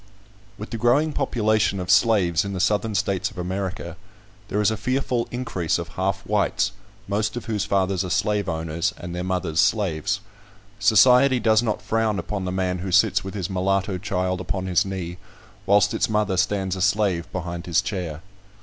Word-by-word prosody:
WITH 105 Hz, -, -8 dB
the 115 Hz, -, -4 dB
growing 140 Hz, +7 st, +3 dB
population 105 Hz, -5 st, +1 dB
of 90 Hz, -, -1 dB
slaves 90 Hz, -8 st, +4 dB
in 100 Hz, 0 st, -5 dB
the 95 Hz, -, -3 dB
Southern 105 Hz, +3 st, +1 dB
States 100 Hz, 0 st, 0 dB
of 95 Hz, -, -17 dB
America, 90 Hz, -1 st, -4 dB, 0.5 s
there 105 Hz, -, -1 dB
is 105 Hz, 0 st, +3 dB
a -, -, -1 dB
fearful 125 Hz, +2 st, -1 dB
increase 105 Hz, -10 st, -2 dB
of 85 Hz, -1 st, -5 dB
half 95 Hz, +2 st, -2 dB
whites, 105 Hz, -1 st, +1 dB, 0.4 s
most 105 Hz, +3 st, -1 dB
of 115 Hz, -, -5 dB
whose 105 Hz, -3 st, -1 dB
fathers 95 Hz, -1 st, +1 dB
are 90 Hz, -, -5 dB
slaveowners 85 Hz, -5 st, -1 dB
and 85 Hz, 0 st, -7 dB
their 90 Hz, +1 st, -3 dB
mothers 90 Hz, -3 st, -1 dB
slaves. 100 Hz, -2 st, +1 dB, 0.6 s
Society 125 Hz, +5 st, +5 dB
does 110 Hz, -1 st, +4 dB
not 110 Hz, -3 st, -2 dB
frown 110 Hz, -2 st, 0 dB
upon 100 Hz, -2 st, -3 dB
the 90 Hz, -, -2 dB
man 90 Hz, -1 st, -1 dB
who 95 Hz, +1 st, -4 dB
sits 100 Hz, +1 st, +3 dB
with 95 Hz, +1 st, -7 dB
his 95 Hz, -4 st, -2 dB
mulatto 95 Hz, 0 st, 0 dB
child 95 Hz, -2 st, -1 dB
upon 95 Hz, +1 st, -3 dB
his 95 Hz, +3 st, +2 dB
knee, 90 Hz, -2 st, -5 dB, 0.5 s
whilst 100 Hz, +1 st, +4 dB
its -, -, 0 dB
mother 105 Hz, -3 st, +1 dB
stands 95 Hz, 0 st, 0 dB
a 95 Hz, -, -5 dB
slave 100 Hz, -4 st, +1 dB
behind 85 Hz, -1 st, -5 dB
his 85 Hz, -2 st, +3 dB
chair. 85 Hz, -5 st, -4 dB
95 Hz, 175 wpm, -23 LUFS, 90-105 Hz, 0.6 s, Society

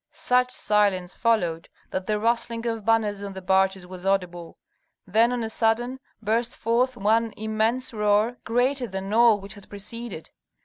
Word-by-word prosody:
Such 250 Hz, 0 st, +2 dB
silence 200 Hz, -6 st, +1 dB
followed 175 Hz, -8 st, 0 dB, 0.2 s
that 185 Hz, 0 st, -3 dB
the 215 Hz, -1 st, +1 dB
rustling 230 Hz, +1 st, -1 dB
of 225 Hz, -2 st, -2 dB
banners 215 Hz, -2 st, +1 dB
on 200 Hz, -1 st, -6 dB
the 190 Hz, -, -7 dB
barges 190 Hz, 0 st, +2 dB
was 180 Hz, 0 st, -10 dB
audible. 180 Hz, -3 st, -2 dB, 0.5 s
Then 225 Hz, +5 st, +3 dB
on 245 Hz, -2 st, -1 dB
a 220 Hz, -, -3 dB
sudden 240 Hz, +4 st, 0 dB, 0.2 s
burst 230 Hz, +3 st, 0 dB
forth 245 Hz, +3 st, 0 dB
one 225 Hz, +1 st, +2 dB
immense 220 Hz, +4 st, 0 dB
roar, 210 Hz, +3 st, +2 dB
greater 245 Hz, +2 st, +1 dB
than 195 Hz, 0 st, -5 dB
all 230 Hz, -2 st, +5 dB
which 195 Hz, 0 st, -7 dB
had 205 Hz, -2 st, -14 dB
preceded. 205 Hz, -3 st, -6 dB
220 Hz, 160 wpm, -25 LUFS, 195-235 Hz, 0.5 s, all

